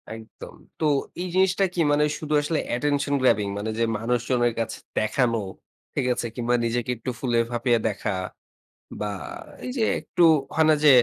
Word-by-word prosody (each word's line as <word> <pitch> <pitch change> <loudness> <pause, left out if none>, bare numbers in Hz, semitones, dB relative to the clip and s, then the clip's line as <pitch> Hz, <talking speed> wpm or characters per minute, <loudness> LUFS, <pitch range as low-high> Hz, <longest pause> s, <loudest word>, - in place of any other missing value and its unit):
একদম। 110 -1 -11 0.2
তো 160 - +1 0.4
এই 185 - -2
জিনিসটা 190 +1 +3
কি, 175 - -4
মানে 145 0 +3
ওই 150 - -3
শুধু 155 -1 -3
আসলে 150 +2 -1
অ্যাটেনশন 145 +3 0
গ্রাবিং, 105 -5 +3
মানে 105 +2 -3
যে - - +3
মানুষজনের 120 +1 +1
কাছে 115 - -2 0.2
দেখানো, 115 +2 +1 0.5
ঠিক - - -1
আছে? 120 - -3
কিংবা 120 0 +1
নিজেকে 120 +1 -1
একটু 115 - -5
ফুলে-ফাঁপিয়ে 120 -1 +1
দেখা 105 0 -3 0.9
বা 105 - -1 0.6
এই 250 - -3
যে 230 - +2 0.2
একটু 175 - 0 0.3
হয় 160 - +4
না? 155 - +6
যে - - +9
120 Hz, 165 wpm, -25 LUFS, 115-145 Hz, 0.9 s, যে